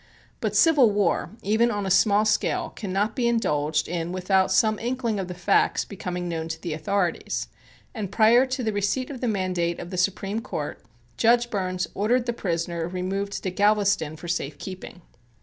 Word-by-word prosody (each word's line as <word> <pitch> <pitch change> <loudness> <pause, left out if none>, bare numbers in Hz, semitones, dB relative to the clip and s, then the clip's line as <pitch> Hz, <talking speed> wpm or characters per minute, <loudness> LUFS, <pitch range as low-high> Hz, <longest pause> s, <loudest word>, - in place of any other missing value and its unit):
But - - -2
civil 300 -8 +6
war, 200 -4 +1
even 220 +4 +3
on 205 -3 -2
a 190 - -1
small 205 +2 +4
scale, 215 -1 0
cannot 205 +1 -2
be 245 -3 +1
indulged 155 -10 +1
in 170 0 -3
without 190 +1 +1
some 215 +3 +3
inkling 235 -3 -2
of 190 - -3
the 180 - -6
facts 180 +3 +2
becoming 180 -3 -5
known 165 -1 -3
to 160 0 -5
the 165 -1 -4
authorities, 175 +3 -1 0.4
and 210 -5 -5
prior 230 +5 +5
to 255 0 -3
the 220 -2 -1
receipt 205 +7 -1
of 260 - -8
the 250 - 0
mandate 185 -5 -1
of 175 - -8
the 185 - -4
Supreme 195 +3 0
Court, 255 - -5 0.4
Judge 240 +1 +3
Burns 185 -3 -1
ordered 235 +4 +1
the 240 - -1
prisoner 170 -5 -2
removed 190 +3 -3
to 185 - -2
Galveston 200 -5 +2
for 175 - -10
safe 150 -4 -2
keeping. 185 -1 -9
195 Hz, 180 wpm, -25 LUFS, 175-220 Hz, 0.4 s, civil